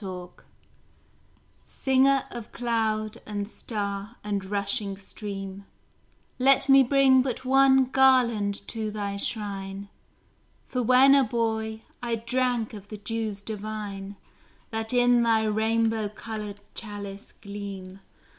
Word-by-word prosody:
SHELLEY 180 -3 -6 1.3
Singer 270 +1 +2
of 235 -2 -8
cloud 220 -3 -1
and 205 -1 -3
star 205 -1 -5
and 205 -2 -2
rushing 200 0 -1
stream, 195 -1 -7 0.7
Let 270 +1 +5
me 270 0 +8
bring 265 0 +5
but 255 0 -3
one 265 0 +5
garland 240 -7 +3
to 220 -2 -3
thy 205 -1 -4
shrine, 200 -2 -3 0.8
For 250 - -2
when 255 +3 +6
a 280 -1 +6
boy 220 -1 -2 0.2
I 235 -1 -1
drank 240 0 -1
of 205 -2 -10
the 215 - -7
dews 215 -1 -4
divine 205 -2 -6 0.6
That 225 0 -2
in 245 -1 +4
thy 225 -1 +3
rainbow 220 0 +1
coloured 210 -1 -7
chalice 205 -2 -7
gleam. 200 -2 -8
220 Hz, 115 wpm, -26 LUFS, 200-245 Hz, 1.3 s, me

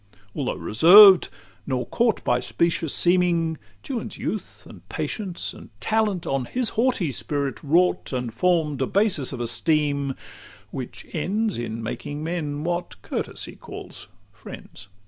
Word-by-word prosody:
Though - - -2
reserved, 185 - +8 0.4
nor 130 -2 -1
caught 235 -2 0
By 120 0 +2
specious 165 +1 0
seeming, 175 -3 +2 0.2
Juan's 250 -4 -5
youth, - - -5
and - - -13
patience, 190 -6 -4
And - - -13
talent, 215 -5 0
on 135 -2 -1
his 245 - -1
haughty 230 - +1
spirit 135 +5 -2
wrought, 170 +5 +2
And 125 -3 -3
form'd 160 -6 +1
a 130 - +1
basis 195 - +1
of 130 - -6
esteem, 140 +3 0 0.6
which 130 -2 -7
ends 200 - -1
In 115 -1 -5
making 145 +6 -5
men 155 -3 -3
what 175 +1 -3
courtesy - - -4
calls - - -9 0.3
friends. 95 - -11
160 Hz, 130 wpm, -24 LUFS, 135-185 Hz, 0.6 s, reserved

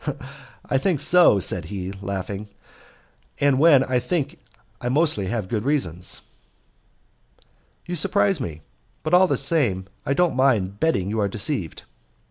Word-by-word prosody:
"I 135 - 0
think 170 0 0
so," 175 - +5
said 90 -1 -1
he, 95 -2 -5
laughing, 100 +1 -5 0.9
"and 140 -2 +2
when 145 -4 +6
I 125 -1 0
think 150 +5 -3 0.4
I 120 - -2
mostly 140 - +3
have 110 -2 -3
good 110 +1 -2
reasons." 95 - -2 1.6
"You 175 - -4
surprise 195 0 +2
me; 80 -9 -6 0.4
but 155 - -3
all 185 +1 +6
the - - 0
same 115 - +1 0.2
I 140 - -1
don't 175 -2 +1
mind 110 -7 +1
betting 100 - 0
you 110 - -2
are 100 - +1
deceived." 100 - -2
125 Hz, 140 wpm, -23 LUFS, 100-155 Hz, 1.6 s, when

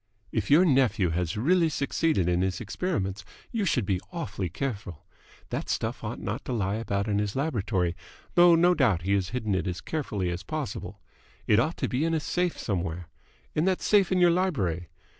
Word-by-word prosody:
"If - - -2
your 160 +6 +6
nephew 130 - +3
has 85 +2 -1
really 165 +8 +3
succeeded 140 - 0
in 90 0 +2
his 95 -1 -1
experiments, 100 - -2 0.3
you 225 -4 -1
should 125 - +1
be 95 -1 0
awfully 105 - -4
careful. 100 - -5 0.4
That - - -4
stuff - - -2
ought - - -4
not - - -4
to 130 - -3
lie 100 -2 0
about 100 -2 -2
in 105 -1 +1
his 105 -1 -2
laboratory, 105 - 0 0.4
though 175 -1 +7
no 175 +2 +5
doubt 115 - +2
he 100 +2 +1
has 95 -3 +1
hidden 110 -4 -2
it 95 +1 0
as 90 -1 -3
carefully 105 - -2
as 85 +1 -4
possible. - - -5 0.5
It 105 - +4
ought 155 +8 0
to - - -1
be 130 +4 -1
in 165 0 +1
a - - +1
safe 180 +3 -1
somewhere. 85 -4 -3 0.4
In 155 - +1
that 190 -1 +2
safe 200 -3 +4
in 185 - +3
your 175 -1 +5
library. 105 - 0
110 Hz, 195 wpm, -27 LUFS, -, 0.5 s, though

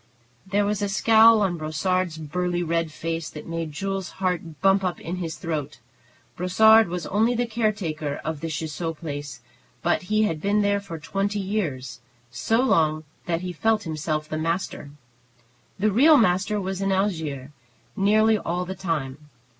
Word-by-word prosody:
There 200 +1 +1
was 205 0 -1
a 205 - 0
scowl 220 +1 +6
on 180 -3 0
Brossard's 165 +2 -1
burly 175 +3 -2
red 165 -1 -1
face 165 0 -4
that 150 - -9
made 165 -1 -4
Jules's 195 +4 -4
heart 180 -5 -3
bump 195 0 +3
up 180 -2 -2
in 175 +2 -5
his 165 -3 -4
throat. 150 -4 -4 0.6
Brossard 220 +5 +5
was 175 -1 -4
only 220 +5 +1
the 240 +1 +1
caretaker 200 -11 -2
of 160 -1 -3
the 165 - -4
Ciseaux 160 +1 -4
place, 145 -4 -6 0.4
but 175 - +2
he 215 0 +3
had 165 -7 -1
been 205 +1 +2
there 200 0 +2
for 195 -5 -8
twenty 195 +6 -2
years, 170 - -3 0.3
so 225 - +1
long 155 -11 +2 0.2
that 170 -1 0
he 180 -1 -4
felt 220 +5 +1
himself 155 -1 -3
the 155 - -3
master. 165 -2 -2 0.9
The 210 +2 +2
real 290 +9 +6
master 205 -1 +2
was 190 0 -3
in 195 0 0
Algiers 160 -9 -1 0.4
nearly 215 +2 +3
all 180 0 -2
the 190 - -4
time. 150 -6 -4
180 Hz, 160 wpm, -24 LUFS, 160-205 Hz, 0.9 s, scowl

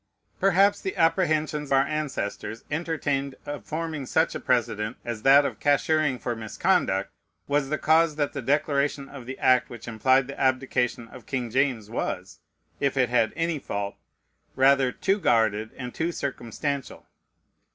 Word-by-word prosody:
Perhaps 195 +1 +4
the 190 - -3
apprehensions 155 -3 +1
our 135 0 +5
ancestors 135 -7 -4
entertained 145 -4 -2
of 145 -1 -6
forming 155 -4 -4
such 160 +5 +2
a - - -4
precedent 115 -2 0
as 115 -2 -4
that 140 +3 +6
"of - - -4
cashiering 145 -1 +2
for 120 0 -3
misconduct" 110 -1 0 0.4
was 145 -1 +1
the 155 - 0
cause 160 0 +3
that 145 -1 -1
the 140 - -4
declaration 140 +1 0
of 135 -4 -11
the 130 - -6
act 125 -1 +3
which 120 - -10
implied 130 +3 +3
the 140 - -9
abdication 130 -3 0
of 125 -2 -13
King 125 -4 -3
James 130 -4 +1
was, 115 - -4 0.4
if 140 -1 0
it 125 -3 +3
had 115 -3 +2
any 165 -1 -1
fault, 100 -5 -4 0.6
rather 135 -1 +4
too 195 +9 0
guarded 110 - +2
and 125 -2 -6
too 165 +2 -1
circumstantial. 140 -1 -4
135 Hz, 150 wpm, -26 LUFS, 120-150 Hz, 0.6 s, that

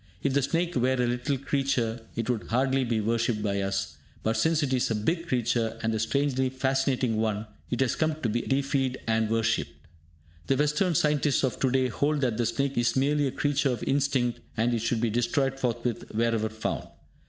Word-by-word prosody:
If 140 - +1
the 140 - +3
snake 170 +6 0
were 130 +1 +2
a 125 -1 +1
little 125 +3 -1
creature, 130 -4 -1
it 115 - -2
would 120 -4 -1
hardly 130 +2 +2
be 115 -2 0
worshipped 115 0 0
by 100 -1 0
us; 95 -6 -2 0.3
but 110 +1 +1
since 160 -1 +2
it 130 -2 0
is 130 0 +1
a 115 - 0
big 165 - -1
creature, 120 -5 0
and 110 0 +1
a 110 - -1
strangely 130 +3 +1
fascinating 130 -2 0
one, 110 -1 -1 0.2
it 120 - -1
has 130 - +2
come 155 -1 0
to - - +2
be 120 +3 0
deified 135 -1 0
and 110 -1 +1
worshipped. 115 -9 0 0.7
The 135 - +2
Western 150 +5 +1
scientists 150 -1 +2
of 130 -4 -1
to 130 - +2
day 130 0 +2
hold 145 +5 0
that 120 -5 0
the 120 -2 +1
snake 140 -2 -1
is 120 0 +1
merely 145 +2 +2
a - - -2
creature 145 +1 +1
of 120 -4 -2
instinct, 135 -3 +1 0.2
and 115 +2 +2
it 115 - +1
should 115 0 0
be 120 -2 +1
destroyed 135 +4 0
forthwith 120 -2 -1
wherever 115 -1 +1
found. 110 0 -3
125 Hz, 200 wpm, -27 LUFS, 115-140 Hz, 0.7 s, the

